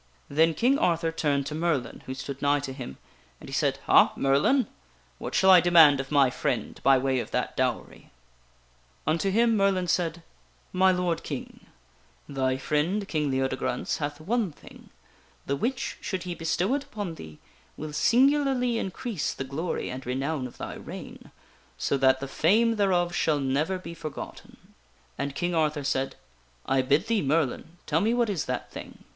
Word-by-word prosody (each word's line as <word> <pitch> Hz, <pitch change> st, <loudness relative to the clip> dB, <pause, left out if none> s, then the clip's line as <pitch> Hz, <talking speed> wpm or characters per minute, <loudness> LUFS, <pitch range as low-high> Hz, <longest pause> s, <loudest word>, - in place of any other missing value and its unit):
Then 160 Hz, +3 st, +3 dB
King 265 Hz, +4 st, +2 dB
Arthur 165 Hz, -1 st, +1 dB
turned 145 Hz, -4 st, 0 dB
to 150 Hz, -, -5 dB
Merlin, 155 Hz, -6 st, -1 dB
who 130 Hz, -, -4 dB
stood 135 Hz, +1 st, -7 dB
nigh 145 Hz, 0 st, +3 dB
to 135 Hz, -1 st, -5 dB
him, 130 Hz, -, -8 dB, 0.4 s
and -, -, -12 dB
he -, -, -9 dB
said: -, -, +1 dB
" -, -, -22 dB
Ha, -, -, +6 dB
Merlin! 140 Hz, -, +3 dB, 0.5 s
What -, -, -5 dB
shall 190 Hz, 0 st, +6 dB
I 180 Hz, -2 st, +8 dB
demand 160 Hz, -5 st, +6 dB
of 135 Hz, 0 st, -4 dB
my 140 Hz, -3 st, +4 dB
friend 120 Hz, -3 st, -2 dB
by 135 Hz, -1 st, +5 dB
way 130 Hz, 0 st, 0 dB
of -, -, -5 dB
that -, -, -2 dB
dowery -, -, -2 dB, 0.5 s
?" -, -, -35 dB
Unto 165 Hz, +6 st, +1 dB
him 230 Hz, +3 st, +3 dB
Merlin 195 Hz, -3 st, +2 dB
said: 170 Hz, -1 st, -1 dB, 0.3 s
" -, -, -35 dB
My 190 Hz, -, +7 dB
lord 180 Hz, -2 st, 0 dB
King, -, -, -7 dB, 0.6 s
thy 130 Hz, -2 st, -1 dB
friend 165 Hz, +9 st, -1 dB
King 150 Hz, -5 st, -1 dB
Leodegrance 130 Hz, -1 st, -1 dB
hath 145 Hz, 0 st, -4 dB
one 210 Hz, +3 st, -1 dB
thing, -, -, -16 dB, 0.6 s
the 140 Hz, -, 0 dB
which, 240 Hz, -, -3 dB
should 190 Hz, -3 st, -3 dB
he 180 Hz, -1 st, -4 dB
bestow 170 Hz, +6 st, 0 dB
it 280 Hz, 0 st, -1 dB
upon 210 Hz, -10 st, -5 dB
thee, 80 Hz, -, -11 dB, 0.4 s
will 150 Hz, 0 st, -6 dB
singularly 255 Hz, -, +3 dB
increase 190 Hz, -, -3 dB
the -, -, -4 dB
glory 150 Hz, +6 st, -3 dB
and 130 Hz, +1 st, -6 dB
renown 135 Hz, +2 st, -2 dB
of 120 Hz, -, -15 dB
thy -, -, -6 dB
reign, -, -, -10 dB, 0.5 s
so 140 Hz, -, 0 dB
that 130 Hz, -1 st, +3 dB
the 135 Hz, -, -5 dB
fame 220 Hz, +11 st, +2 dB
thereof 180 Hz, -4 st, +2 dB
shall 155 Hz, -3 st, +1 dB
never 140 Hz, +7 st, 0 dB
be 180 Hz, -2 st, -8 dB
forgotten.'* 155 Hz, -3 st, -9 dB, 0.5 s
And 140 Hz, -1 st, -3 dB
King 175 Hz, +3 st, -1 dB
Arthur 155 Hz, -2 st, 0 dB
said: 135 Hz, 0 st, -1 dB, 0.3 s
" -, -, -35 dB
I 135 Hz, 0 st, +2 dB
bid 145 Hz, +7 st, +2 dB
thee, 225 Hz, -2 st, +1 dB
Merlin, 155 Hz, +3 st, -1 dB
tell 160 Hz, +2 st, +1 dB
me 225 Hz, +4 st, +2 dB
what 235 Hz, -3 st, +1 dB
is 180 Hz, -6 st, -2 dB
that -, -, -4 dB
thing." -, -, -10 dB
160 Hz, 180 wpm, -27 LUFS, 135-190 Hz, 0.6 s, I